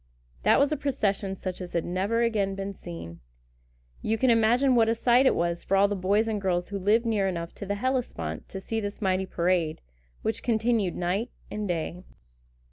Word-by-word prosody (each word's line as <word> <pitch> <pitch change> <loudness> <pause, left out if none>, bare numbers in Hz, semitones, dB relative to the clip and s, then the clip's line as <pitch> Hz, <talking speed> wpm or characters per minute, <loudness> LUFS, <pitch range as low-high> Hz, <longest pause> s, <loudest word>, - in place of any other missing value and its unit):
That - - +4
was 280 +1 +3
a 305 - 0
procession 205 -8 -1
such 185 -1 -5
as 180 - -7
has 170 -1 0
never 200 +6 0
again 205 -4 0
been 195 0 -4
seen. 85 - -9 0.8
You 225 - 0
can 255 +2 +3
imagine 235 +4 +4
what 225 -2 +4
a 230 - +2
sight 245 +3 +4
it - - +4
was 170 0 -1
for 195 - +1
all 200 +1 +5
the 205 - -2
boys 200 +4 +2
and 215 -2 -1
girls 180 -2 0
who 200 -1 -3
lived 215 +5 +3
near 210 -4 +1
enough 170 -2 -3
to 200 - -6
the 205 - -1
Hellespont 225 - -2
to 190 - -6
see 225 +4 -3
this 205 -1 -5
mighty 190 -2 0
parade, 170 -3 0 0.4
which 220 - -1
continued 225 -4 +1
night 185 +7 -1 0.2
and 210 -1 -3
day. 175 0 -3
200 Hz, 200 wpm, -27 LUFS, 180-225 Hz, 0.8 s, all